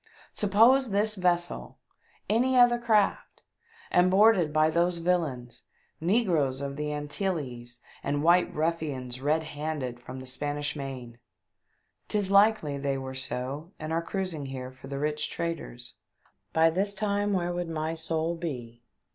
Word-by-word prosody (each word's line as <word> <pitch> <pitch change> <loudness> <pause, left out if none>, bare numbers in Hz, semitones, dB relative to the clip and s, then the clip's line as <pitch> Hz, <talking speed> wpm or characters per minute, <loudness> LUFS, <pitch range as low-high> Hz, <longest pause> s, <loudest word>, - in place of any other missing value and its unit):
Sup 205 - -1
pose 240 +6 +5
this 210 +2 +2
vessel 175 -3 -1 0.5
any 255 +4 +2
other 240 -1 +6
craft 220 -4 +1 0.5
and 180 +1 +4
boarded 195 -4 +5
by 155 +1 +3
those 170 +2 +1
villains, 140 -9 -1 0.4
negroes 165 - +1
of 140 0 -4
the 150 0 -3
Antilles, 145 -6 -4 0.2
and 145 +1 -1
white 175 +2 +4
ruffians 145 -6 -2
red 155 +3 +1
handed 150 -5 -4
from 130 +2 -9
the 130 - -9
Spanish 145 +3 -3
Main 130 -4 -7 0.4
— - - -47
'tis 205 -2 0
likely 200 -8 +4
they 140 -1 -1
were 130 0 -6
so 130 +6 -5
and 155 +1 -4
are 165 - +1
cruising 170 -5 -4
here 130 -1 -6
for 130 +1 -13
the 140 0 -4
rich 150 +1 -1
traders 165 -8 -5 0.3
— 95 +1 -39
by 165 0 +4
this 200 +4 0
time 205 0 0
where 175 -2 0
would 175 -1 -3
my 160 0 -2
soul 165 +1 -1
be 125 -9 -6
160 Hz, 150 wpm, -28 LUFS, 135-185 Hz, 0.5 s, other